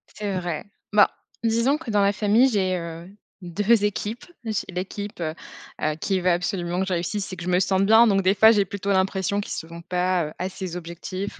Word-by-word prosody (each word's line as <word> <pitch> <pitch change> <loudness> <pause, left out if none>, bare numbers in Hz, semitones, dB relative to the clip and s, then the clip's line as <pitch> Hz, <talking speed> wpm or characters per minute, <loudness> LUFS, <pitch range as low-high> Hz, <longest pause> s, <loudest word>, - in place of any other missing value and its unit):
C'est 200 -3 -2
vrai. 175 -3 -4 0.3
Bah, 210 - +6 0.3
disons 230 +5 +2
que 305 -7 -6
dans 205 -1 +3
la 200 0 +3
famille, 215 +6 +4
j'ai, 190 -4 +1
heu, 170 +1 -7 0.3
2 205 +5 +2
équipes, 210 +3 -3 0.2
j'ai 215 -3 -2
l'équipe, 195 +2 -5
heu 155 -1 -2 0.5
heu, 155 0 0
qui 190 -2 0
veut 180 0 +2
absolument 175 0 -1
que 190 - -1
je 185 - -1
réussisse 190 +4 -2
et - - -5
que 175 - -8
je 180 - -3
me 180 0 +3
sente 190 +1 +2
bien 225 +2 +7
donc 195 -2 +3
des 190 +1 +3
fois, 220 +2 +7
j'ai 205 -3 +3
plutôt 200 +1 -3
l'impression 190 +1 +1
qu'ils - - -8
sont 170 +1 -7
pas, 180 -1 0
heu, 155 - -9
assez 185 -1 -4
objectifs 180 +3 -6
190 Hz, 210 wpm, -24 LUFS, 180-205 Hz, 0.5 s, bien